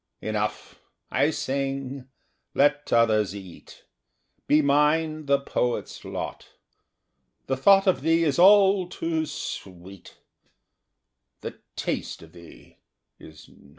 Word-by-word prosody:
Enough! 105 0 -4 0.3
I 140 +3 +2
sing; 135 -2 -3 0.5
let 145 +1 +2
others 110 -4 +2
eat: 95 -4 -12 0.6
Be 150 +1 +4
mine 150 +2 +1
the 140 0 +3
poet's 125 -3 -3
lot. - - -6 1.0
The 135 - -1
thought 195 +8 +5
of 185 -8 +2
thee 165 +3 +2
is 150 -1 0
all 195 -1 +6
too 160 -2 -2
sweet 95 -4 -8 1.2
The - - -8 0.2
taste - - -4
of 80 - -16
thee 85 -2 -16 0.4
is 80 -1 -14
not. 70 - -21
140 Hz, 110 wpm, -25 LUFS, 110-160 Hz, 1.2 s, all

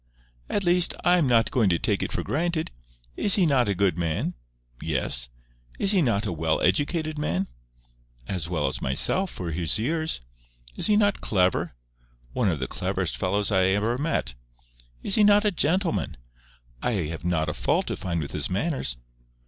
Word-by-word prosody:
"At 205 - 0
least, 175 0 +3
I 180 0 +4
am 150 - +2
not 115 -2 +3
going 115 -6 +2
to 85 - +2
take - - 0
it - - -3
for - - -2
granted. 165 +1 -1 0.4
Is 200 - +4
he 190 - +4
not 130 -8 +2
a 100 - 0
good 90 -3 +1
man?" 85 +1 -1 0.5
"Yes." 65 -5 -1 0.5
"Is 200 - +3
he 195 -3 +4
not 115 -6 +1
a 95 - -2
well 80 0 0
educated 155 - 0
man?" 95 - -1 0.8
"As 90 -3 -4
well 80 -4 -1
as 65 - -2
myself—for 90 - +1
his 80 +3 0
years." 160 +8 -1 0.6
"Is - - 0
he 210 -1 +4
not 205 -2 +2
clever?" 90 - 0 0.6
"One 110 -5 +1
of 80 - -1
the 65 - -3
cleverest - - -2
fellows 100 +2 -1
I 95 -2 +3
ever 105 +5 +1
met" 145 - -1 0.7
"Is - - 0
he 215 - +4
not 205 +1 +5
a 210 - +3
gentleman?" 160 - 0 0.6
"I 125 - 0 0.2
have 80 - -8
not 85 -3 0
a 75 - -2
fault - - 0
to - - -3
find 85 -3 -3
with 70 - -7
his - - -1
manners." 100 - -1
105 Hz, 180 wpm, -25 LUFS, -, 0.8 s, not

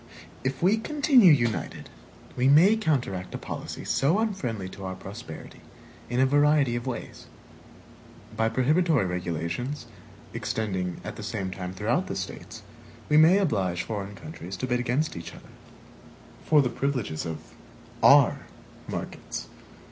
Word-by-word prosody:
If 130 +3 -2
we 200 +5 +4
continue 260 - +5
united, 120 - 0 0.5
we 125 +1 +2
may 165 +10 +7
counteract 130 - -1
a - - -2
policy - - -7
so 150 +8 +2
unfriendly 140 - -2
to 100 - -10
our 95 0 -4
prosperity 95 -3 -10 0.5
in 120 +1 -1
a 130 - +5
variety 145 -2 +3
of 120 +2 -4
ways. 125 - -6 1.1
By 110 0 +1
prohibitory 145 - +2
regulations, 90 - -3 0.5
extending, 95 -5 -2
at - - -7
the - - -7
same 95 -3 -3
time, 90 -1 -6
throughout - - 0
the - - -4
States, - - -7 0.5
we 150 - +5
may 160 +5 +7
oblige 95 - 0
foreign 100 -2 -5
countries 95 - -8
to 115 - -2
bid 125 -1 0
against 125 +6 0
each 85 0 -8
other, - - -15 0.9
for 150 -2 +5
the 125 - 0
privileges 125 - -2
of 80 -2 -7 0.5
our - - +5 0.4
markets. - - -6
125 Hz, 140 wpm, -26 LUFS, 95-150 Hz, 1.1 s, may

